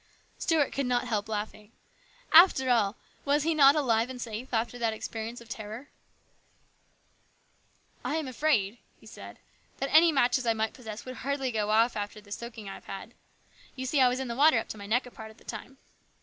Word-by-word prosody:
Stuart 315 -4 +1
could 275 -2 -1
not 250 0 0
help 215 -2 -2
laughing. 210 0 -5 0.6
After 315 -6 +7
all, 215 -4 +2 0.3
was 285 +1 +2
he 330 +1 +1
not 280 -2 +6
alive 235 -5 +1
and 255 -1 -7
safe 235 +1 -6
after 240 +1 -1
that 230 -2 0
experience 225 +2 -6
of 235 - -14
terror? 220 +4 -8 1.0
" - - -38
I - - -2
am 315 -3 -2
afraid," 245 -5 0 0.2
he - - -19
said, - - -11 0.2
" - - -36
that 275 - -3
any 325 +2 +7
matches 250 -3 +2
I 230 - +4
might 220 0 -2
possess 220 -3 -9
would 255 0 -7
hardly 270 -1 -2
go 215 -2 -1
off 225 +3 +3
after 205 +1 -4
the 205 -1 -18
soaking 225 -1 -7
I 195 - -6
have - - -12
had. 195 +4 -8 0.6
You 260 -1 -5
see 270 +1 +2
I 255 - +6
was 250 +1 -2
in 265 - -3
the 235 - -4
water 295 0 +5
up 225 - -3
to - - -6
my 200 - -8
neck 240 +5 +1
a 250 - -11
part 220 -1 -10
of 220 - -16
the - - -20
time." 270 - -8
240 Hz, 210 wpm, -28 LUFS, 220-270 Hz, 1.0 s, After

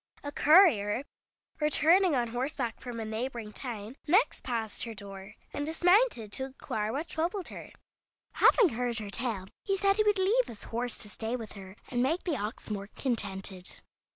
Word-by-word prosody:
A 285 - -4
courier, 285 - +5 0.6
returning 320 +3 +4
on 240 -2 0
horseback 245 0 -3
from 245 -2 -6
a 225 - -3
neighboring 220 0 -4
town, 235 0 -6
next 385 +10 +3
passed 225 -4 -2
her 230 -1 -6
door, 195 +1 -9 0.2
and 290 - -2
dismounted 345 - +3
to 265 - -1
inquire 220 -5 -3
what 300 +6 -3
troubled 350 +4 -2
her. - - -9 0.6
Having 440 -8 +6
heard 245 -1 -2
her 210 -3 -4
tale, 225 -5 -2 0.2
he 390 -1 +1
said 395 +1 +3
he 430 - +4
would 415 -1 +3
leave 425 +7 +3
his 215 - -9
horse 240 +1 -2
to 210 - -7
stay 225 +4 -3
with 225 -4 -6
her, 190 -1 -10
and 245 -1 0
make 315 +8 +1
the 340 -5 0
ox 215 -1 -5
more 200 -1 -3
contented. 195 -6 -4
245 Hz, 175 wpm, -30 LUFS, 215-320 Hz, 0.6 s, Having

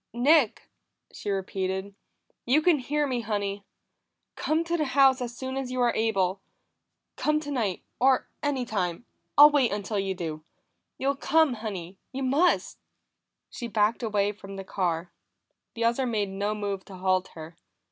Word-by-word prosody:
"Nick!" 265 0 +3 0.5
she - - -6
repeated. 190 0 -2 0.5
"You 290 +6 +4
can 335 -4 +4
hear 295 +4 0
me, 255 -4 -1
Honey. 205 -2 -3 0.7
Come 315 +2 0
to 335 +1 -1
the 310 -3 +1
house 270 -1 +6
as 240 -1 -5
soon 260 0 -4
as 265 -2 -3
you 255 - -3
are 240 -1 +3
able. 195 -4 0 0.8
Come 305 0 +1
tonight, 250 - -2 0.2
or 260 0 +3
any 285 -4 -1
time; 190 -1 -2 0.3
I'll 295 +1 +10
wait 275 -5 +3
until 205 +1 -2
you 195 -1 -1
do. 155 -3 -5 0.5
You'll 275 +1 0
come, 315 0 +3
Honey; 195 -5 -6
you 270 +1 -4
must!" 285 +8 +2 0.7
She 240 - -5
backed 215 +1 +1
away 205 -3 +1
from 195 -1 -10
the 195 - -6
car; 175 -3 -2 0.6
the 230 - -2
other 235 +3 +2
made 210 -4 -1
no 200 +2 -2
move 200 -2 -3
to 195 - -11
halt 185 0 +1
her. 160 +1 -9
220 Hz, 155 wpm, -27 LUFS, 195-270 Hz, 0.8 s, I'll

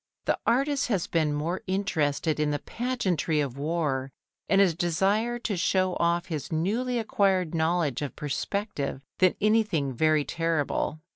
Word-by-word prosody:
The - - +1
artist 275 +3 +2
has 200 -8 0
been 160 -3 +1
more 155 +5 -2
interested 160 -5 0
in 150 -1 +2
the 145 - 0
pageantry 185 - -1
of 140 -4 -1
war 145 -3 -1 0.4
and 195 - +4
a 190 -4 +5
desire 195 +8 +1
to 235 -4 -2
show 185 +1 +1
off 170 +1 +1
his 155 -5 -5
newly 225 +10 0
acquired 195 -6 +1
knowledge 160 -5 +1
of 145 - -4
perspective, 150 - -3 0.2
than 185 -1 +4
anything 210 -11 +2
very 155 +3 +2
terrible. 165 -2 -1
170 Hz, 145 wpm, -27 LUFS, 150-200 Hz, 0.4 s, a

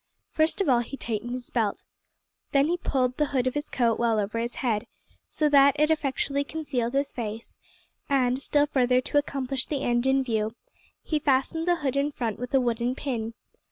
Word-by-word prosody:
First 315 +5 +2
of 390 - 0
all 250 -3 +4
he 240 +3 -5
tightened 230 -1 -3
his 250 -1 -6
belt. 220 -4 -1 0.7
Then 280 +2 +4
he 350 - +2
pulled 255 -6 0
the 300 - +2
hood 260 -3 0
of 255 - 0
his 295 +1 -2
coat 235 -3 +1
well 230 -2 +2
over 210 +3 -2
his 235 +1 -3
head, 225 -5 -1 0.4
so 305 - 0
that 280 -1 +6
it 305 +1 +4
effectually 280 -2 0
concealed 275 -5 -3
his 280 0 0
face, 225 -1 -6 0.5
and, 260 -1 +2
still 290 +1 +2
further 250 -3 +2
to 290 +3 +1
accomplish 270 -2 -3
the 285 -3 -2
end 240 +1 +1
in 270 0 +3
view, 220 -2 -1 0.5
he 310 - 0
fastened 290 +4 +1
the 350 - +4
hood 265 - 0
in 280 +1 +1
front 230 -6 -3
with 250 0 -5
a - - +6
wooden 240 0 0
pin. 230 -5 -3
260 Hz, 195 wpm, -26 LUFS, 240-285 Hz, 0.7 s, that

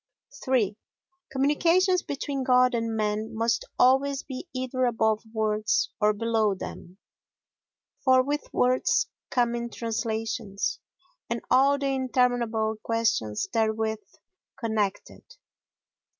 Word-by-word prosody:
iii 225 -6 +2 0.6
Communications 340 +7 +3
between 280 -1 -3
God 250 0 +4
and 230 -1 -1
man 215 +1 -2
must 225 -1 0
always 270 +2 +3
be 265 +6 -7
either 255 0 -1
above 220 -2 +1
words 215 -1 0
or 210 0 +5
below 220 -1 +1
them; 180 0 -9 1.1
for 260 -1 +5
with 290 +2 -3
words 255 - +2 0.2
come 240 -1 +1
in 235 0 -3
translations, 225 -3 -3 0.5
and 235 0 -1
all 275 +2 +5
the 280 - -3
interminable 245 -4 +1
questions 225 - 0
therewith 220 -1 0 0.6
connected. 220 -4 -2
235 Hz, 105 wpm, -26 LUFS, 220-260 Hz, 1.1 s, or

